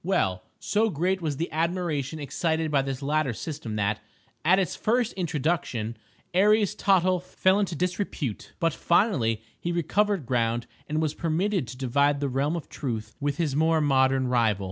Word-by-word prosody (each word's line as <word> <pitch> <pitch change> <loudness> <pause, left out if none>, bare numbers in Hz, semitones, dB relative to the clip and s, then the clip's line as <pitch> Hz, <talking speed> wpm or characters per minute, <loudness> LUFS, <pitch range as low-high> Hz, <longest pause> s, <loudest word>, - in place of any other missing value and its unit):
Well, 95 - +1 0.2
so 210 +4 +1
great 185 +3 0
was 150 -4 -2
the 170 - -3
admiration 160 -3 -1
excited 160 +2 -1
by 140 -2 +3
this 135 0 -4
latter 150 -2 +1
system 140 -4 -5
that, 105 0 0 0.4
at 180 +4 +5
its 185 -1 0
first 235 +1 +1
introduction, 150 - -1 0.4
Aries 205 +2 +4
Tottle 185 -2 +3
fell 185 +2 +1
into 190 -5 -1
disrepute; 180 - -3
but 165 -3 +1
finally 130 - +2 0.2
he 175 - -2
recovered 180 +1 +1
ground 115 -1 0 0.2
and 155 +1 0
was 155 -1 0
permitted 170 - 0
to 125 - -8
divide 140 +3 +2
the 140 -1 -1
realm 140 +5 0
of 165 - -5
Truth 110 -6 -4
with 145 -1 -1
his 155 -5 0
more 160 +1 +3
modern 135 -2 +3
rival. 115 -5 +2
155 Hz, 165 wpm, -26 LUFS, 130-180 Hz, 0.4 s, at